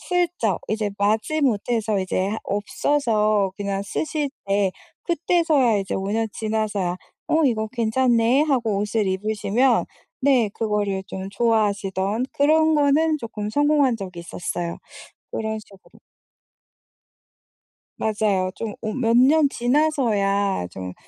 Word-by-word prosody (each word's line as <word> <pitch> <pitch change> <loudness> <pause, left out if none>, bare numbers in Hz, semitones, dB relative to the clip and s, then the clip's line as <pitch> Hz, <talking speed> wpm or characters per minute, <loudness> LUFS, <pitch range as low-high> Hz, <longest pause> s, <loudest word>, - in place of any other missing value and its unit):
슬쩍 350 - 0
이제 215 -1 -1
마지 220 +10 +1
못해서 220 -4 0
이제 185 0 -1
하 220 - -2
없어서 210 -1 +1
그냥 200 -1 -2
쓰실 295 +7 -2 0.2
때 195 -1 +2 0.3
그때서야 320 - +2
이제 195 - -3
5 195 +1 -2
년 225 0 0
지나서야 215 -5 -2 0.3
"어 320 0 +3
이거 220 -5 +1
괜찮네."하고 240 0 +2
옷을 210 0 0
입으시면 215 +5 +1 0.4
네. 260 -5 +3
그거를 205 -3 -1
좀 190 0 -6
좋아하시던 205 0 0
그런 315 +2 +3
거는 305 +2 +3
쪼끔 215 -4 -5
성공한 290 -1 +3
적이 185 -4 -7
있었어요 170 0 -4 0.5
그런 220 0 -3
식으로. 195 -2 -19 2.0
맞아요. 205 -4 0
좀 220 -3 -5
오 215 -1 -3
몇 235 -3 +2
년 285 +4 +5
지나서야 225 - +1
좀 90 0 -7
220 Hz, 250 characters per minute, -23 LUFS, 200-265 Hz, 2.0 s, 년